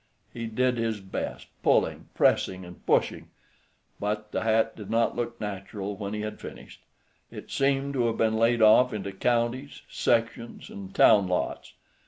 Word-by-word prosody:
He 115 Hz, -1 st, -5 dB
did 125 Hz, +2 st, 0 dB
his 115 Hz, -2 st, -1 dB
best, 95 Hz, -1 st, -5 dB, 0.2 s
pulling, -, -, +1 dB
pressing, 95 Hz, -1 st, +2 dB
and 90 Hz, 0 st, -13 dB
pushing, -, -, +1 dB, 0.7 s
but 105 Hz, +1 st, -3 dB
the -, -, -1 dB
hat 110 Hz, 0 st, +2 dB
did 105 Hz, -3 st, -9 dB
not 115 Hz, 0 st, +1 dB
look 120 Hz, -1 st, -3 dB
natural 100 Hz, 0 st, -5 dB
when 100 Hz, 0 st, -5 dB
he 105 Hz, -, -3 dB
had 105 Hz, 0 st, -6 dB
finished. -, -, -10 dB, 0.5 s
It -, -, -10 dB
seemed 140 Hz, 0 st, +1 dB
to 125 Hz, -3 st, +1 dB
have 115 Hz, -, -1 dB
been 110 Hz, -1 st, +2 dB
laid 115 Hz, 0 st, +3 dB
off 115 Hz, +3 st, +6 dB
into 100 Hz, -2 st, -4 dB
counties, 120 Hz, +6 st, -1 dB
sections, 115 Hz, 0 st, -1 dB
and 95 Hz, -1 st, -8 dB
town 100 Hz, -3 st, +6 dB
lots. 90 Hz, 0 st, -2 dB
110 Hz, 160 wpm, -27 LUFS, 100-120 Hz, 0.7 s, off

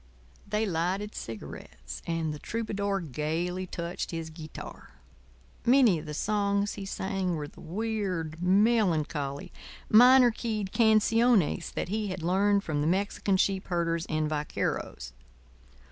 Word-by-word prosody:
They 210 Hz, +2 st, 0 dB
lighted 190 Hz, +3 st, -1 dB
cigarettes; 65 Hz, -, -8 dB
and 165 Hz, -2 st, -1 dB
the 150 Hz, -, -7 dB
troubadour 200 Hz, -2 st, -2 dB
gaily 165 Hz, +5 st, -2 dB
touched 170 Hz, 0 st, -4 dB
his 165 Hz, -1 st, -5 dB
guitar. 155 Hz, -1 st, -10 dB, 0.7 s
Many 240 Hz, -8 st, +5 dB
of 155 Hz, -, -10 dB
the 150 Hz, -, -5 dB
songs 200 Hz, +1 st, 0 dB
he 195 Hz, -, -7 dB
sang 190 Hz, -2 st, -2 dB
were 150 Hz, -2 st, -4 dB
the -, -, -15 dB
weird, 185 Hz, -5 st, -3 dB
melancholy, 180 Hz, -8 st, +1 dB, 0.4 s
minor 250 Hz, +2 st, +8 dB
keyed 215 Hz, -4 st, -3 dB
canciones 225 Hz, -3 st, +3 dB
that -, -, -2 dB
he 215 Hz, +1 st, -1 dB
had 185 Hz, -3 st, -5 dB
learned 200 Hz, +3 st, +2 dB
from 145 Hz, -2 st, -1 dB
the 150 Hz, -, +1 dB
Mexican 195 Hz, +2 st, +1 dB
sheep 190 Hz, 0 st, 0 dB
herders 170 Hz, -2 st, -1 dB
and 155 Hz, -1 st, 0 dB
vaqueros. 145 Hz, -, -3 dB
185 Hz, 130 wpm, -28 LUFS, 160-210 Hz, 0.7 s, minor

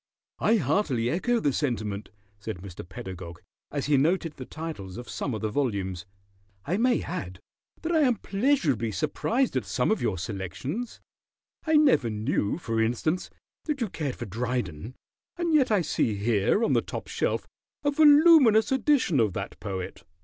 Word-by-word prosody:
"I 225 Hz, -, +3 dB
heartily 135 Hz, -, +1 dB
echo 235 Hz, +8 st, +1 dB
the 145 Hz, -9 st, +1 dB
sentiment," 110 Hz, -7 st, -2 dB, 0.3 s
said 105 Hz, 0 st, -5 dB
Mr. 90 Hz, -1 st, -9 dB
Pedagog, 90 Hz, -3 st, -8 dB, 0.3 s
as 145 Hz, -2 st, -3 dB
he 145 Hz, -1 st, +3 dB
noted 165 Hz, +3 st, +1 dB
the 130 Hz, -, -9 dB
titles 155 Hz, -, -7 dB
of 120 Hz, -, -8 dB
some 130 Hz, -, -3 dB
of 110 Hz, -, -5 dB
the 110 Hz, -1 st, -1 dB
volumes. 100 Hz, -9 st, -2 dB, 0.6 s
"I 175 Hz, +6 st, 0 dB
may 245 Hz, +1 st, +2 dB
add 95 Hz, -, -5 dB, 0.4 s
that 330 Hz, -, -1 dB
I 325 Hz, -, +3 dB
am 255 Hz, -5 st, +4 dB
pleasurably 195 Hz, -, +1 dB
surprised 235 Hz, -, 0 dB
at -, -, +1 dB
some -, -, 0 dB
of 220 Hz, -, +1 dB
your 110 Hz, -6 st, 0 dB
selections. 105 Hz, -, -5 dB, 0.7 s
I 315 Hz, -, +3 dB
never 275 Hz, -, +4 dB
knew, 110 Hz, +1 st, -1 dB
for 115 Hz, -9 st, -1 dB
instance, 125 Hz, +10 st, 0 dB, 0.4 s
that 300 Hz, -3 st, -2 dB
you 230 Hz, -4 st, -1 dB
cared 145 Hz, -7 st, -3 dB
for -, -, -6 dB
Dryden, 115 Hz, -, -3 dB, 0.4 s
and 340 Hz, -2 st, 0 dB
yet 285 Hz, -4 st, +4 dB
I 210 Hz, -4 st, +3 dB
see 115 Hz, -7 st, 0 dB
here 105 Hz, -, +1 dB
on -, -, +2 dB
the -, -, +3 dB
top -, -, -6 dB
shelf -, -, -1 dB, 0.4 s
a 290 Hz, -, +2 dB
voluminous 290 Hz, -7 st, +6 dB
edition 265 Hz, -, +2 dB
of 105 Hz, -5 st, +2 dB
that 100 Hz, 0 st, -5 dB
poet." 95 Hz, -3 st, -5 dB
140 Hz, 165 wpm, -27 LUFS, -, 0.7 s, voluminous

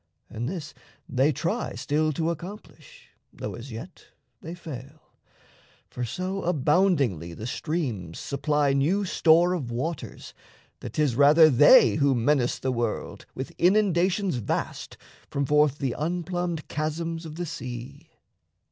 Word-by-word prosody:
And 120 Hz, +4 st, -3 dB
this 170 Hz, -4 st, -6 dB, 0.3 s
they 135 Hz, +4 st, +2 dB
try 170 Hz, -, -2 dB
Still 155 Hz, +1 st, 0 dB
to 165 Hz, +3 st, 0 dB
accomplish, 180 Hz, +6 st, -10 dB, 0.2 s
though -, -, -6 dB
as 120 Hz, +3 st, -9 dB
yet 135 Hz, +11 st, -9 dB, 0.4 s
they 165 Hz, +2 st, -7 dB
fail, 150 Hz, -3 st, -10 dB, 0.8 s
For 125 Hz, -, -4 dB
so 185 Hz, +8 st, -3 dB
aboundingly 145 Hz, -, +1 dB
the 110 Hz, -, -7 dB
streams 125 Hz, -, -3 dB
supply 145 Hz, 0 st, 0 dB
New 170 Hz, +9 st, +1 dB
store 170 Hz, 0 st, +4 dB
of 145 Hz, -10 st, -3 dB
waters 135 Hz, +7 st, -5 dB, 0.5 s
that -, -, -8 dB
'tis 150 Hz, -6 st, +1 dB
rather 150 Hz, +4 st, +7 dB
they 145 Hz, -, +7 dB
Who 140 Hz, -3 st, +3 dB
menace 125 Hz, +1 st, +1 dB
the 130 Hz, -, -2 dB
world 120 Hz, -3 st, -3 dB
with 130 Hz, -, -6 dB
inundations 185 Hz, -2 st, +2 dB
vast 115 Hz, -, -4 dB, 0.3 s
From 140 Hz, 0 st, -1 dB
forth 150 Hz, 0 st, +3 dB
the 135 Hz, -5 st, -2 dB
unplumbed 175 Hz, 0 st, -3 dB
chasms 165 Hz, +2 st, -3 dB
of 155 Hz, -, -9 dB
the 175 Hz, +1 st, -3 dB
sea. 125 Hz, -5 st, -8 dB
150 Hz, 130 wpm, -26 LUFS, 130-175 Hz, 0.8 s, rather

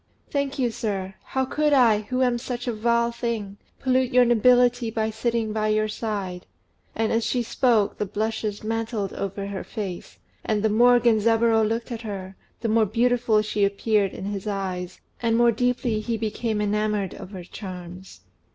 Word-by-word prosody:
"Thank 280 Hz, -1 st, -1 dB
you, 245 Hz, -3 st, +1 dB
sir. 195 Hz, -4 st, -3 dB
How 265 Hz, 0 st, -1 dB
could 300 Hz, +2 st, +1 dB
I, 230 Hz, -6 st, +5 dB
who 255 Hz, 0 st, +1 dB
am 245 Hz, -1 st, +1 dB
such 245 Hz, 0 st, -5 dB
a 240 Hz, -, 0 dB
vile 235 Hz, +2 st, +1 dB
thing, 230 Hz, -4 st, -4 dB, 0.2 s
pollute 260 Hz, -1 st, +1 dB
your 250 Hz, 0 st, +6 dB
nobility 245 Hz, 0 st, +4 dB
by 220 Hz, 0 st, -1 dB
sitting 225 Hz, -1 st, -1 dB
by 215 Hz, 0 st, 0 dB
your 215 Hz, 0 st, +2 dB
side?" 200 Hz, -5 st, -4 dB, 0.5 s
And, 225 Hz, 0 st, 0 dB
as 230 Hz, 0 st, +1 dB
she 245 Hz, +1 st, 0 dB
spoke, 230 Hz, -3 st, +1 dB
the 210 Hz, -, -1 dB
blushes 215 Hz, 0 st, -3 dB
mantled 220 Hz, -2 st, -2 dB
over 195 Hz, 0 st, -4 dB
her 200 Hz, -1 st, -5 dB
face; 195 Hz, -6 st, -6 dB, 0.3 s
and 215 Hz, -1 st, 0 dB
the 220 Hz, -, +3 dB
more 245 Hz, +3 st, +5 dB
Genzaburô 225 Hz, 0 st, +3 dB
looked 230 Hz, +2 st, -3 dB
at 230 Hz, -1 st, -4 dB
her, 195 Hz, -4 st, -6 dB, 0.3 s
the 230 Hz, -, -1 dB
more 220 Hz, 0 st, +3 dB
beautiful 230 Hz, 0 st, +2 dB
she 210 Hz, -1 st, -1 dB
appeared 200 Hz, 0 st, +1 dB
in -, -, -6 dB
his 200 Hz, 0 st, -4 dB
eyes, 185 Hz, -3 st, -4 dB, 0.2 s
and 230 Hz, -1 st, +2 dB
the -, -, +3 dB
more 240 Hz, 0 st, +5 dB
deeply 245 Hz, -1 st, 0 dB
he 225 Hz, +1 st, -2 dB
became 220 Hz, 0 st, -2 dB
enamoured 210 Hz, -2 st, 0 dB
of -, -, -9 dB
her 190 Hz, -3 st, -8 dB
charms. 180 Hz, -, -9 dB
220 Hz, 180 wpm, -24 LUFS, 205-240 Hz, 0.5 s, your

